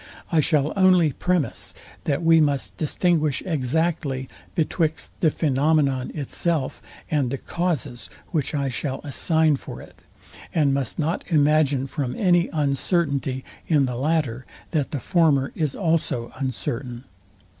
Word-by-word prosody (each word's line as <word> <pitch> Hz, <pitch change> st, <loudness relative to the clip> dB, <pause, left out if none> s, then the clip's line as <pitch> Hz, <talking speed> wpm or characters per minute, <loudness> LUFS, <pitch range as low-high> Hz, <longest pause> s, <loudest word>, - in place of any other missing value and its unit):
I 165 Hz, -, +4 dB
shall 150 Hz, -1 st, +2 dB
only 185 Hz, -5 st, +5 dB
premise, 175 Hz, -5 st, -1 dB, 0.3 s
that 150 Hz, +2 st, 0 dB
we 165 Hz, -1 st, +6 dB
must 145 Hz, -3 st, 0 dB
distinguish 155 Hz, -2 st, +1 dB
exactly 150 Hz, -3 st, -1 dB, 0.3 s
betwixt 160 Hz, -1 st, 0 dB
the 160 Hz, -, +4 dB
phænomenon 140 Hz, -3 st, +1 dB
itself, 150 Hz, 0 st, -2 dB, 0.3 s
and 145 Hz, -5 st, +1 dB
the 140 Hz, -, -2 dB
causes, 155 Hz, -9 st, -3 dB, 0.2 s
which 155 Hz, -4 st, -1 dB
I 140 Hz, -1 st, 0 dB
shall 130 Hz, +2 st, -3 dB
assign 160 Hz, +1 st, +2 dB
for -, -, -9 dB
it; -, -, -14 dB, 0.5 s
and 145 Hz, -4 st, +3 dB
must 135 Hz, -3 st, -2 dB
not 160 Hz, +2 st, -1 dB
imagine 150 Hz, -4 st, +3 dB
from 135 Hz, -2 st, -3 dB
any 175 Hz, -3 st, +3 dB
uncertainty 140 Hz, -2 st, 0 dB, 0.2 s
in 150 Hz, -4 st, +3 dB
the 125 Hz, -1 st, -3 dB
latter, 135 Hz, -3 st, -1 dB, 0.2 s
that 150 Hz, -5 st, 0 dB
the 145 Hz, -, -3 dB
former 150 Hz, -4 st, +2 dB
is 150 Hz, -4 st, -1 dB
also 160 Hz, -9 st, 0 dB
uncertain. 125 Hz, -1 st, -4 dB
150 Hz, 130 wpm, -24 LUFS, 135-165 Hz, 0.5 s, we